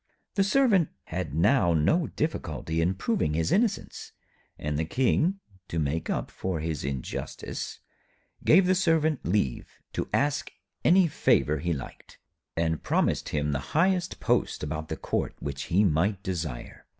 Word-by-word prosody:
The 200 Hz, -, +3 dB
Servant 200 Hz, -, +3 dB
had 85 Hz, -4 st, -4 dB
now 90 Hz, -, +4 dB
no 150 Hz, -, +2 dB
difficulty 80 Hz, -, -2 dB
in 90 Hz, +3 st, +1 dB
proving 95 Hz, -, 0 dB
his 80 Hz, 0 st, 0 dB
innocence, 215 Hz, -1 st, 0 dB, 0.4 s
and 75 Hz, 0 st, -2 dB
the -, -, +1 dB
King, 135 Hz, -, +1 dB, 0.3 s
to 85 Hz, -, -4 dB
make 80 Hz, +1 st, -1 dB
up -, -, -2 dB
for 95 Hz, -3 st, -3 dB
his 80 Hz, -2 st, -3 dB
injustice, 65 Hz, -2 st, -5 dB, 0.6 s
gave 180 Hz, +3 st, +6 dB
the 185 Hz, -, +4 dB
Servant 160 Hz, -5 st, +2 dB
leave 85 Hz, -8 st, 0 dB, 0.2 s
to -, -, -3 dB
ask 145 Hz, 0 st, +1 dB, 0.3 s
any 180 Hz, 0 st, +6 dB
favour 75 Hz, -, +2 dB
he 85 Hz, -, -1 dB
liked, 70 Hz, -5 st, -7 dB, 0.4 s
and 80 Hz, -1 st, 0 dB
promised -, -, +1 dB
him 75 Hz, -1 st, 0 dB
the 70 Hz, -, 0 dB, 0.2 s
highest 180 Hz, +1 st, +2 dB
post -, -, 0 dB
about 80 Hz, +1 st, -3 dB
the -, -, -3 dB
Court -, -, -2 dB
which 70 Hz, -1 st, -4 dB
he 95 Hz, +5 st, +3 dB
might 95 Hz, +3 st, +1 dB
desire. 80 Hz, -, -5 dB
90 Hz, 150 wpm, -27 LUFS, -, 0.6 s, gave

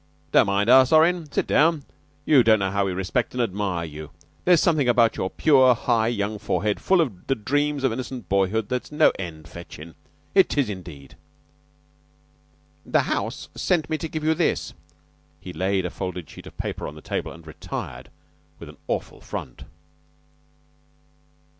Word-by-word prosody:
"Don't -, -, +5 dB
mind 100 Hz, +1 st, +1 dB
us, 130 Hz, +1 st, +6 dB
Orrin; 160 Hz, -1 st, +3 dB
sit -, -, 0 dB
down. 160 Hz, -1 st, +2 dB, 0.4 s
You 140 Hz, -4 st, +6 dB
don't 110 Hz, -2 st, +5 dB
know 95 Hz, -2 st, -1 dB
how 100 Hz, 0 st, 0 dB
we -, -, -1 dB
respect 95 Hz, +7 st, -2 dB
and 125 Hz, -, +1 dB
admire 95 Hz, -5 st, -2 dB
you. 75 Hz, -1 st, -9 dB, 0.4 s
There's 175 Hz, -2 st, +5 dB
something 155 Hz, -7 st, +2 dB
about 115 Hz, -2 st, +4 dB
your 95 Hz, -, -2 dB
pure, 130 Hz, -3 st, +4 dB
high 110 Hz, 0 st, +1 dB
young 105 Hz, -2 st, -2 dB
forehead, 105 Hz, +1 st, -1 dB
full 190 Hz, -2 st, +3 dB
of 110 Hz, -, -4 dB
the 135 Hz, -, +1 dB
dreams 145 Hz, +5 st, -1 dB
of 130 Hz, -4 st, +2 dB
innocent 125 Hz, -3 st, -6 dB
boyhood, 100 Hz, +2 st, +1 dB
that's 125 Hz, +2 st, -4 dB
no 150 Hz, -, +4 dB
end 80 Hz, -4 st, -7 dB
fetchin'. 85 Hz, -1 st, -11 dB, 0.4 s
It 190 Hz, -5 st, +3 dB
is, 130 Hz, -7 st, +1 dB
indeed." 85 Hz, -8 st, -10 dB, 1.7 s
"The -, -, +2 dB
house -, -, -3 dB
sent 175 Hz, -4 st, 0 dB
me 155 Hz, -, 0 dB
to 160 Hz, -, -4 dB
give 155 Hz, 0 st, -5 dB
you 160 Hz, +1 st, +3 dB
this." 165 Hz, +1 st, -1 dB, 0.7 s
He 90 Hz, +2 st, -9 dB
laid 95 Hz, 0 st, 0 dB
a 90 Hz, -, -3 dB
folded 90 Hz, -4 st, -5 dB
sheet -, -, -12 dB
of -, -, -14 dB
paper -, -, -4 dB
on 75 Hz, -, -9 dB
the 75 Hz, -, -12 dB
table -, -, -4 dB
and 85 Hz, -1 st, -13 dB
retired 80 Hz, 0 st, -7 dB, 0.5 s
with -, -, -11 dB
an -, -, -14 dB
awful -, -, -4 dB
front. 60 Hz, -, -7 dB
110 Hz, 170 wpm, -24 LUFS, 95-140 Hz, 1.7 s, us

